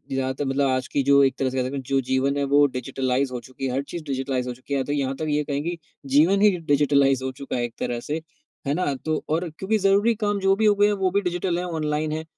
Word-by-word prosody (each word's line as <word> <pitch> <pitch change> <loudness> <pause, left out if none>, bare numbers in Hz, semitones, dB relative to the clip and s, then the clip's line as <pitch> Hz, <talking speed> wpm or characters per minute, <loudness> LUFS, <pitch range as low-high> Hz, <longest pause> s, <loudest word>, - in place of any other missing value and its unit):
जहाँ 130 0 -1
तक 130 - -7
मतलब 135 +1 +1
आज 130 0 -1
की 140 - 0
जो 140 +1 +5
एक 135 - +2
तरह 135 - +1
से, 130 0 -1
जो 135 +1 0
जीवन 130 +2 0
है 140 - 0
वो 145 0 +6
डिजिटलाइज़ 130 0 -1
हो 125 - -3
चुकी 130 +2 -8
है 130 - -1
हर 135 - 0
चीज़ 165 +3 -7
डिजिटलाइज़ 135 -3 -2
हो 125 - -3
चुकी 130 +3 -8
है। 140 - +1
या - - 0
तो 145 - -5
यहाँ 135 -2 -1
तक 155 - -4
ये 150 0 +1
कहेंगे 150 +4 -3 0.4
जीवन 180 +7 +5
ही 210 - +7
डिजिटलाइज़ 140 -4 +2
हो 130 - -2
चुका 135 +1 -6
है 120 - -1
एक 120 -1 -4
तरह 120 - -2
से, 150 +6 -4 0.5
है 140 - +1
ना? 155 -3 0
तो 155 +3 -3
और 165 +3 0
क्योंकि 210 +3 0
ज़रूरी 200 +3 +3
काम 205 -1 +1
जो 195 0 +3
भी 220 +2 +1
हो 210 -1 +5
गए 205 0 +4
हैं 210 - +2
वो 185 -1 +2
भी 200 +2 +1
डिजिटल 180 -1 -1
है, 180 - -3
ऑनलाइन 155 -2 -2
है 155 +1 -3
140 Hz, 270 wpm, -24 LUFS, 130-170 Hz, 0.5 s, ही